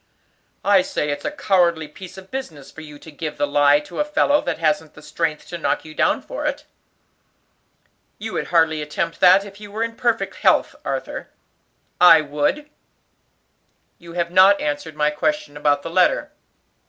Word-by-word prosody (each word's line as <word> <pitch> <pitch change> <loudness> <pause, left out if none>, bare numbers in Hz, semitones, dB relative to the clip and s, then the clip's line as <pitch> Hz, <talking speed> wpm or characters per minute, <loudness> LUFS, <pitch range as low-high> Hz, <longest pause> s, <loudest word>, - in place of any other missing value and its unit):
"I 200 -2 +5
say 150 -4 -2
it's 145 - -5
a - - 0
cowardly 175 - +1
piece 185 +4 -12
of 190 0 -13
business 160 - -7
for 160 - -11
you 150 -2 -11
to 160 - -14
give 150 +1 -6
the 145 - +1
lie 145 0 +4
to 150 - -9
a - - +3
fellow 295 0 +2
that - - -3
hasn't 155 -1 -1
the - - -13
strength 160 -2 -3
to 170 - -6
knock - - -1
you 155 - -10
down - - +1
for - - -6
it." - - -4 1.5
"You 220 +1 -6
would - - -3
hardly 160 -2 +2
attempt 165 +3 -4
that 190 +2 +6
if 200 +1 -13
you 205 -1 -10
were 220 +2 -2
in 230 0 -4
perfect 235 -2 -1
health, - - +2
Arthur." - - -5 0.7
"I 165 -3 +8
would." 150 - -2 1.3
"You 170 -1 -12
have 170 -1 -2
not 190 +2 +6
answered 150 +1 -4
my 150 0 +1
question 300 - -2
about 145 -1 +1
the 165 - -6
letter. 185 - +2
165 Hz, 180 wpm, -21 LUFS, 150-200 Hz, 1.5 s, I